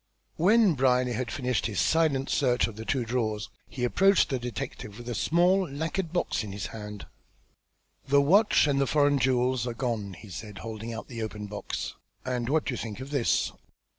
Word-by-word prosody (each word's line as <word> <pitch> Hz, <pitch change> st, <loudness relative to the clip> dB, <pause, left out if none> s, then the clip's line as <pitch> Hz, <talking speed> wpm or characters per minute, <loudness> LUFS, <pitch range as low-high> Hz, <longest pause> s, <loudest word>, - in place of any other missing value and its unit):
When 205 Hz, +2 st, +5 dB
Brierly 125 Hz, -2 st, +2 dB
had 120 Hz, +1 st, -2 dB
finished 125 Hz, -4 st, -1 dB
his 105 Hz, -5 st, -3 dB
silent 155 Hz, -, +2 dB
search 125 Hz, -4 st, +2 dB
of 115 Hz, -, -6 dB
the 110 Hz, +1 st, -7 dB
two 130 Hz, -2 st, 0 dB
drawers, 110 Hz, -3 st, -2 dB, 0.2 s
he 125 Hz, -, -5 dB
approached 195 Hz, +10 st, +4 dB
the 130 Hz, -3 st, -1 dB
detective 110 Hz, -3 st, -6 dB
with 120 Hz, 0 st, -10 dB
a 120 Hz, -, -2 dB
small 175 Hz, -, +2 dB
lacquered 160 Hz, +4 st, -3 dB
box 175 Hz, -8 st, 0 dB
in 100 Hz, -2 st, -7 dB
his 100 Hz, -, -4 dB
hand. 105 Hz, -2 st, -7 dB, 1.0 s
"The 140 Hz, +1 st, +5 dB
watch 195 Hz, +10 st, +5 dB
and 140 Hz, -2 st, +2 dB
the 135 Hz, -, +2 dB
foreign 145 Hz, -1 st, +3 dB
jewels 125 Hz, -1 st, +1 dB
are 120 Hz, -, -3 dB
gone," 110 Hz, -6 st, -3 dB
he 105 Hz, -, -13 dB
said, 105 Hz, +2 st, -7 dB
holding 110 Hz, +1 st, -5 dB
out 115 Hz, -, -6 dB
the 115 Hz, -3 st, -6 dB
open 105 Hz, -1 st, -5 dB
box. 105 Hz, 0 st, -5 dB, 0.3 s
"And 125 Hz, -2 st, -2 dB
what 155 Hz, +2 st, +2 dB
do 130 Hz, -, -1 dB
you -, -, -4 dB
think 110 Hz, 0 st, -5 dB
of 135 Hz, +2 st, -8 dB
this? 140 Hz, -5 st, +1 dB
125 Hz, 195 wpm, -28 LUFS, 110-145 Hz, 1.0 s, When